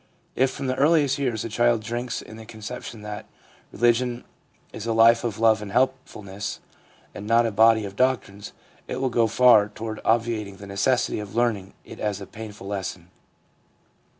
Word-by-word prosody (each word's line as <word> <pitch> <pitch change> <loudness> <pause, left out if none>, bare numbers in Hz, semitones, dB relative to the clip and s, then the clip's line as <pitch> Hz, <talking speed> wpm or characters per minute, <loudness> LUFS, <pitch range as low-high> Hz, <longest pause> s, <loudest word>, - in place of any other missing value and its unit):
If 130 +1 +3
from 135 - -6
the 130 - 0
earliest 145 -1 +3
years 120 -6 -1
the 115 - -5
child 120 0 +2
drinks 120 +3 -4
in 110 - -12
the 110 - -10
conception 110 0 -8
that 105 0 -7 0.4
religion 120 +1 +1 0.5
is 110 - -6
a 115 - +1
life 115 +1 +5
of 115 -4 -3
love 110 -1 +3
and 105 -2 -7
helpfulness 105 -6 -2 0.5
and 105 - -8
not 115 +1 +4
a 115 - 0
body 110 +1 +4
of 100 0 -8
doctrines, 105 -5 -1 0.4
it 125 - -4
will 130 -1 0
go 115 -1 +3
far 110 -3 +5
toward 110 +1 -6
obviating 110 -3 0
the 100 - -10
necessity 100 +5 0
of 105 0 -8
learning 115 -5 0
it - - -11
as 105 -2 -2
a - - -7
painful 105 -3 -10
lesson. 95 -3 -5
115 Hz, 175 wpm, -24 LUFS, 105-120 Hz, 0.5 s, life